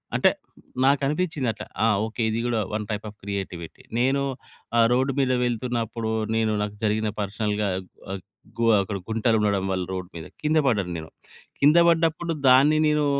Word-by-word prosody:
అంటే - - +5 0.5
నాకు 140 +1 +4
అనిపించింది 155 -2 -1
అట్లా 110 - -8 0.2
ఆహ్, 105 -3 +3
ఓకే. 110 +2 -5
ఇది 110 +1 -1
కూడా 120 -2 0
వన్ 105 0 -2
టైప్ 105 0 -3
ఆఫ్ 105 - -14
క్రియేటివిటీ. 95 -4 -5 0.2
నేను 135 +3 +2 0.6
ఆహ్, 115 - +6
రోడ్ 130 +2 +2
మీద 130 -2 +2
వెళ్తున్నప్పుడు, 115 -2 -2 0.2
నేను 110 -1 +1
నాకు 105 0 -3
జరిగిన 110 0 +1
పర్సనల్‌గా 105 +1 -1 0.4
వ 95 - -3 0.4
గోవ 115 0 +3
అక్కడ 100 +1 -3
గుంటలు 110 0 +2
ఉండడం 100 -2 +1
వల్ల 95 -1 -1
రోడ్ 90 -1 -5
మీద 80 -2 -7 0.2
కింద 155 +1 +2
పడ్డను 100 -9 +1
నేను. 80 -1 -8 0.5
కింద 150 +4 +5
పడ్డప్పుడు 165 0 +2
దాన్ని 135 +4 +6
నేను 150 -1 +2
115 Hz, 165 wpm, -24 LUFS, 105-135 Hz, 0.6 s, ఆహ్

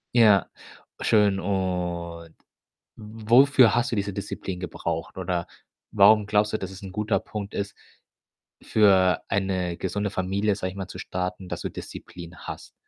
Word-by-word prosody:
Ja, 105 -6 +5 0.5
schön. 105 -3 +3
Und 90 -3 -3 0.6
wofür 115 +4 +4
hast 120 0 +1
du 115 - -1
diese 100 0 -1
Disziplin 95 -2 -5
gebraucht? 85 -1 -4
Oder, 90 -2 -2 0.4
warum 105 +1 +5
glaubst 105 +1 +2
du, 110 - 0
dass 95 - -5
es 95 +1 -11
'n 95 -1 -8
guter 105 +2 0
Punkt 105 -1 -7
ist, 100 0 -3 0.9
für 95 -5 +4
eine 95 -3 -1
gesunde 105 0 -2
Familie, 100 +2 0
sage 95 -2 -4
ich 95 - -12
mal, 95 -1 -5
zu - - -9
starten, 90 +1 -4
dass - - -5
du - - -3
Disziplin 85 -1 -10
hast? - - -9
100 Hz, 150 wpm, -25 LUFS, 90-105 Hz, 0.9 s, Ja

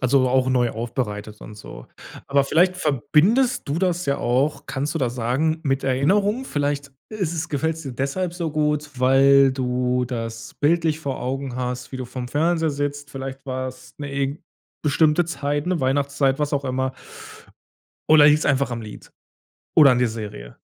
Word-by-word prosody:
Also, 130 0 +3
auch 130 0 +2
neu 125 -2 +2
aufbereitet 110 -3 -4
und 105 - -10
so. 105 - -11 0.4
Aber 140 0 +3
vielleicht 180 +6 +2
verbindest 180 - +2
du 145 +4 -1
das 180 -2 0
ja 140 - 0
auch 135 +4 0
kannst 145 +2 -3
du - - -1
das 125 -3 -1
sagen, 135 +7 0
mit 135 -1 -1
Erinnerung? 200 - +1
Vielleicht 145 - -2 0.2
ist 190 -7 -2
es 165 0 -3
gefällt's 160 +3 -2
dir 135 -4 -6
deshalb 155 +8 -2
so 170 -3 -3
gut, 150 -1 0
weil 135 +1 +5
du 125 -1 0
das 115 -2 -6
bildlich 160 0 +1
vor 140 -5 -4
Augen 135 0 -3
hast, 125 0 -4
wie - - -4
du 130 - -5
vorm 125 0 -6
Fernseher 160 +3 +1
sitzt. 145 0 -3
Vielleicht 135 0 -7
war's 130 -1 -6
'ne 145 -1 -5
irg 140 +2 -2 0.4
bestimmte 155 +2 +3
Zeit, 145 -1 -2
'ne 180 -1 0
Weihnachtszeit, 140 +1 +1
was 150 0 -1
auch 140 0 0
immer. 130 0 -1 1.2
Oder 155 -1 +8
liegt's 150 +1 +4
einfach 140 -2 +1
am 115 -1 -4
Lied 105 -1 -11 0.6
oder 145 -3 +8
an 125 - +1
der 125 - +2
Serie? 105 - -8
140 Hz, 170 wpm, -22 LUFS, 130-150 Hz, 1.2 s, Oder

